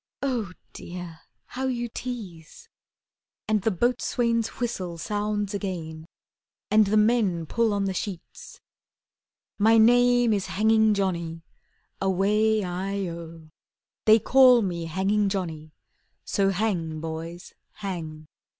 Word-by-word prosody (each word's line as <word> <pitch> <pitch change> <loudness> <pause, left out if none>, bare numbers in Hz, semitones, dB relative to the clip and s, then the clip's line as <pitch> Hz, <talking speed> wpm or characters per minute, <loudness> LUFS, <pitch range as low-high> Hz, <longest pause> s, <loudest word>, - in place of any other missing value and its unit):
Oh, 240 -8 -1 0.2
Dear, 175 -2 -8 0.3
how 265 +1 -4
you 240 -2 -2
tease!" 210 -10 -8 0.8
And 215 -1 +1
the 220 - +1
boatswain's 230 +2 0
whistle 190 -8 -3
sounds 205 +3 -2
again, 165 -5 -5 0.6
And 215 -1 +5
the 215 +2 +2
men 210 -6 +2
pull 230 +6 +1
on 200 -1 0
the 190 - -1
sheets: 185 -2 -7 1.0
"My 225 +2 +5
name 245 +1 +5
is 200 -2 -1
Hanging 220 +1 +3
Johnny, 170 -4 -2 0.6
Away 210 +3 +2
i 190 +2 -3
oh; 165 -1 -9 0.6
They 220 0 +7
call 250 +1 +6
me 170 -3 -3
Hanging 195 +5 +1
Johnny, 160 -6 -4 0.5
So 195 -2 +1
hang, 180 -6 -1
boys, 165 +2 -7 0.2
hang." 165 -7 -6
200 Hz, 115 wpm, -25 LUFS, 170-220 Hz, 1.0 s, They